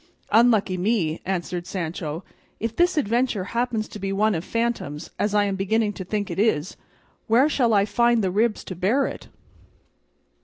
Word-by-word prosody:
"Unlucky 215 Hz, -5 st, +4 dB
me!" 180 Hz, -5 st, 0 dB
answered 180 Hz, -1 st, -3 dB
Sancho; 165 Hz, -2 st, -4 dB, 0.4 s
"if 230 Hz, 0 st, -3 dB
this 350 Hz, +2 st, +2 dB
adventure 240 Hz, -5 st, +1 dB
happens 235 Hz, -2 st, -1 dB
to 210 Hz, -, -9 dB
be 195 Hz, 0 st, -3 dB
one 210 Hz, +2 st, +2 dB
of 165 Hz, -2 st, -2 dB
phantoms, 230 Hz, -10 st, -3 dB
as 210 Hz, 0 st, 0 dB
I 205 Hz, -, +4 dB
am 200 Hz, -1 st, -1 dB
beginning 210 Hz, +2 st, 0 dB
to 190 Hz, -, -6 dB
think 205 Hz, +2 st, -3 dB
it -, -, -4 dB
is, 185 Hz, -6 st, +1 dB, 0.5 s
where 240 Hz, +6 st, +5 dB
shall 255 Hz, -6 st, +2 dB
I 200 Hz, -2 st, +4 dB
find 235 Hz, 0 st, +2 dB
the 185 Hz, -, +1 dB
ribs 215 Hz, +3 st, +1 dB
to 185 Hz, -, -7 dB
bear 215 Hz, +11 st, +2 dB
it?" -, -, -6 dB
210 Hz, 170 wpm, -24 LUFS, 185-230 Hz, 0.5 s, where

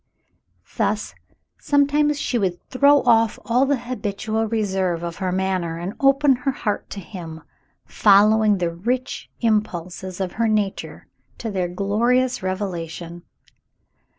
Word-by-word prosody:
Thus, -, -, -1 dB, 0.5 s
sometimes 290 Hz, +1 st, +2 dB
she 245 Hz, -, -1 dB
would 185 Hz, -4 st, -1 dB
throw 280 Hz, +2 st, +5 dB
off 225 Hz, -2 st, +3 dB
all 250 Hz, +4 st, +2 dB
the 285 Hz, 0 st, +2 dB
habitual 225 Hz, -2 st, -3 dB
reserve 190 Hz, -6 st, -1 dB
of 170 Hz, 0 st, -5 dB
her 185 Hz, -2 st, -2 dB
manner 185 Hz, -3 st, -1 dB
and 175 Hz, +4 st, -5 dB
open 275 Hz, -1 st, +4 dB
her 250 Hz, +2 st, -2 dB
heart 215 Hz, -5 st, -3 dB
to 200 Hz, -, -6 dB
him, 165 Hz, -5 st, -9 dB, 0.4 s
following 210 Hz, +1 st, +4 dB
the 175 Hz, -2 st, -1 dB
rich 240 Hz, +9 st, -3 dB
impulses 185 Hz, -5 st, -1 dB
of 185 Hz, -2 st, -2 dB
her 230 Hz, +3 st, 0 dB
nature 210 Hz, -3 st, -2 dB, 0.3 s
to 225 Hz, -, -4 dB
their 185 Hz, -3 st, -1 dB
glorious 235 Hz, +7 st, +1 dB
revelation. 175 Hz, -3 st, -4 dB
210 Hz, 125 wpm, -22 LUFS, 185-245 Hz, 0.5 s, throw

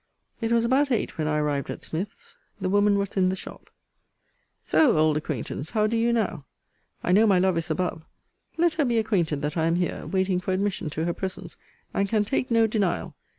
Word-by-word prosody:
It 225 Hz, 0 st, -1 dB
was 235 Hz, 0 st, +3 dB
about 270 Hz, +4 st, +3 dB
eight 235 Hz, -8 st, -1 dB
when 155 Hz, -, 0 dB
I 150 Hz, 0 st, +1 dB
arrived 145 Hz, -2 st, -1 dB
at -, -, -6 dB
Smith's. 185 Hz, +6 st, -5 dB, 0.2 s
The -, -, -1 dB
woman 205 Hz, 0 st, +4 dB
was 200 Hz, -1 st, -1 dB
in 185 Hz, -1 st, +4 dB
the 190 Hz, -, -1 dB
shop. -, -, -10 dB, 0.9 s
So, 270 Hz, -, +4 dB
old 155 Hz, -1 st, +3 dB
acquaintance, 150 Hz, 0 st, -4 dB
how 215 Hz, -1 st, +1 dB
do 220 Hz, +2 st, 0 dB
you 230 Hz, +1 st, +2 dB
now? 215 Hz, -10 st, -1 dB, 0.6 s
I -, -, 0 dB
know 215 Hz, +4 st, +5 dB
my 195 Hz, -3 st, +4 dB
love 185 Hz, 0 st, +2 dB
is 165 Hz, -1 st, -2 dB
above. 165 Hz, 0 st, -1 dB, 0.6 s
Let 340 Hz, 0 st, +3 dB
her 310 Hz, -2 st, +1 dB
be 240 Hz, -2 st, +1 dB
acquainted 170 Hz, -10 st, 0 dB
that 150 Hz, +3 st, -2 dB
I 160 Hz, 0 st, +2 dB
am 165 Hz, -, +2 dB
here, 175 Hz, 0 st, -2 dB
waiting 190 Hz, -1 st, +1 dB
for 185 Hz, +1 st, -2 dB
admission 190 Hz, -4 st, -1 dB
to 160 Hz, +2 st, -3 dB
her 170 Hz, -, 0 dB
presence, 185 Hz, -2 st, -6 dB, 0.4 s
and 200 Hz, 0 st, 0 dB
can 210 Hz, -1 st, +2 dB
take 255 Hz, +3 st, -1 dB
no 230 Hz, -1 st, +4 dB
denial. 195 Hz, -6 st, -1 dB
190 Hz, 210 wpm, -25 LUFS, 165-220 Hz, 0.9 s, know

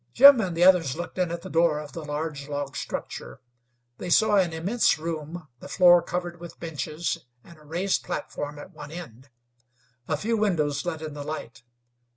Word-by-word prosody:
Jim 275 Hz, -2 st, +9 dB
and 180 Hz, -5 st, -3 dB
the 175 Hz, -, +4 dB
others 180 Hz, -8 st, +5 dB
looked 175 Hz, +2 st, -6 dB
in 180 Hz, -2 st, +1 dB
at 170 Hz, 0 st, -5 dB
the -, -, -7 dB
door 165 Hz, -2 st, +3 dB
of 150 Hz, -2 st, -8 dB
the 165 Hz, -, -7 dB
large 145 Hz, -1 st, -4 dB
log 145 Hz, -1 st, -4 dB
structure. -, -, -6 dB, 0.6 s
They 180 Hz, -, -5 dB
saw 210 Hz, +3 st, +5 dB
an 180 Hz, -3 st, +3 dB
immense 180 Hz, +6 st, +2 dB
room, 160 Hz, +1 st, -5 dB
the -, -, -10 dB
floor 175 Hz, -1 st, +6 dB
covered 175 Hz, 0 st, -4 dB
with 170 Hz, 0 st, -10 dB
benches, 160 Hz, 0 st, -3 dB, 0.2 s
and 170 Hz, -2 st, -16 dB
a -, -, -18 dB
raised 175 Hz, +6 st, -1 dB
platform 145 Hz, 0 st, -5 dB
at 145 Hz, +6 st, -10 dB
one 150 Hz, -2 st, -9 dB
end. 140 Hz, -6 st, -10 dB, 0.8 s
A 155 Hz, -, 0 dB
few 225 Hz, +7 st, 0 dB
windows 155 Hz, -9 st, +1 dB
let 160 Hz, -2 st, -3 dB
in 155 Hz, -1 st, -5 dB
the 145 Hz, -, -7 dB
light. 145 Hz, -6 st, -6 dB
165 Hz, 190 wpm, -26 LUFS, 150-175 Hz, 0.8 s, Jim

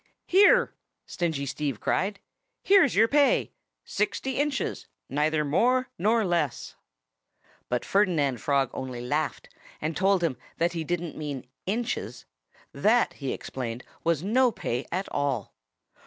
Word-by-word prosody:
"Here!" 410 Hz, +6 st, +5 dB, 0.3 s
Stingy 160 Hz, -5 st, -2 dB
Steve 140 Hz, -3 st, -3 dB
cried. 200 Hz, +2 st, 0 dB, 0.4 s
"Here's 380 Hz, -, +5 dB
your 220 Hz, +3 st, +5 dB
pay 285 Hz, +2 st, +3 dB, 0.3 s
sixty 210 Hz, +6 st, -2 dB
inches, 285 Hz, -8 st, -1 dB, 0.2 s
neither 150 Hz, +2 st, +1 dB
more 250 Hz, -, +2 dB
nor 220 Hz, +4 st, +2 dB
less!" 170 Hz, -7 st, -1 dB, 0.9 s
But 125 Hz, 0 st, -1 dB
Ferdinand 155 Hz, -, +1 dB
Frog 140 Hz, -3 st, +1 dB
only 130 Hz, -2 st, -5 dB
laughed 125 Hz, 0 st, -2 dB, 0.3 s
and 155 Hz, +1 st, -3 dB
told 190 Hz, -1 st, +2 dB
him 150 Hz, -7 st, 0 dB, 0.2 s
that 170 Hz, +1 st, +1 dB
he 165 Hz, -2 st, -2 dB
didn't 175 Hz, 0 st, -3 dB
mean 145 Hz, -4 st, -5 dB, 0.2 s
inches. 190 Hz, -, -3 dB, 0.5 s
That, 220 Hz, +12 st, +3 dB
he 135 Hz, -3 st, -4 dB
explained, 120 Hz, -2 st, -5 dB, 0.2 s
was 165 Hz, -2 st, +1 dB
no 245 Hz, +5 st, +3 dB
pay 125 Hz, -, -3 dB
at 185 Hz, +3 st, -2 dB
all. 140 Hz, -7 st, -1 dB
170 Hz, 125 wpm, -27 LUFS, 140-215 Hz, 0.9 s, Here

